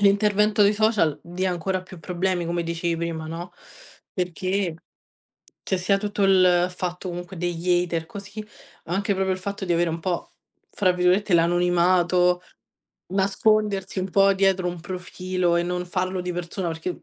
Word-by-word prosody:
l'intervento 205 +1 +3
dei 200 +1 +5
social 205 -9 +2
dia 185 +2 -2
ancora 185 +2 -2
più 185 -1 -12
problemi, 180 +1 -1
come 170 0 -1
dicevi 170 0 -2
prima, 165 -1 -3
no? 165 +2 -6 0.6
Perché 185 0 -1 0.9
c'è 190 - -1
sia 195 +2 +1
tutto 205 0 -2
il 180 -2 +5
fatto 180 +1 -4
comunque 175 +1 -6
degli 175 +1 +1
hater 165 -2 -3
così, 205 +3 -8 0.4
anche 195 +4 -1
proprio 190 0 0
il 185 - -3
fatto 200 0 -5
di 175 - +1
avere 170 0 +2
un 165 - -4
po' 175 +1 -3 0.4
fra 185 -3 +2
virgolette 180 +2 +2
"l'anonimato" 175 +1 +3 0.7
nascondersi 195 0 +1
un 185 0 -4
po' 195 +1 +5
dietro 190 -1 +2
un 175 -1 -5
profilo 180 0 -2
e 170 - +2
non 180 0 -2
farlo 185 0 -2
di 180 0 -3
persona 175 +1 -4
perché 165 +2 -5
180 Hz, 155 wpm, -24 LUFS, 175-195 Hz, 0.9 s, dei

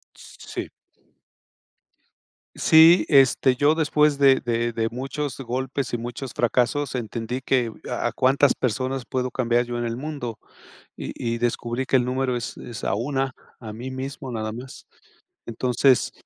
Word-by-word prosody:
S - - -15
sí. - - -6 1.9
Sí, 160 +3 +7
este, 135 -2 +4
yo 145 +3 +4
después 150 -2 +2
de 135 -1 +6
de 120 -1 -1
de 115 0 -1
muchos 135 +2 -4
golpes 130 +2 -3
y - - +1
muchos 120 +2 -6
fracasos 125 +4 0
entendí 120 +2 -4
que 125 -3 +1 0.2
a 120 -1 -1
a - - -2
cuántas 135 +2 +3
personas 130 +2 -2
puedo 130 -1 -2
cambiar 120 -1 +1
yo 120 0 -4
en 120 - -2
el 115 0 -3
mundo, 130 -6 -5 0.6
y - - -5 0.2
y - - -4
descubrí 120 +2 -2
que 135 - +1
el 125 - +4
número 125 0 -1
es 120 -2 -5
es 115 -3 -8
a - - 0
una. 135 +4 -1 0.3
A 110 -2 -7
mí 120 +5 -7
mismo, 130 +1 -6
nada 110 -1 -3
más. 125 +4 -10 0.6
Entonces, 125 +2 +2
125 Hz, 155 wpm, -24 LUFS, 120-135 Hz, 1.9 s, Sí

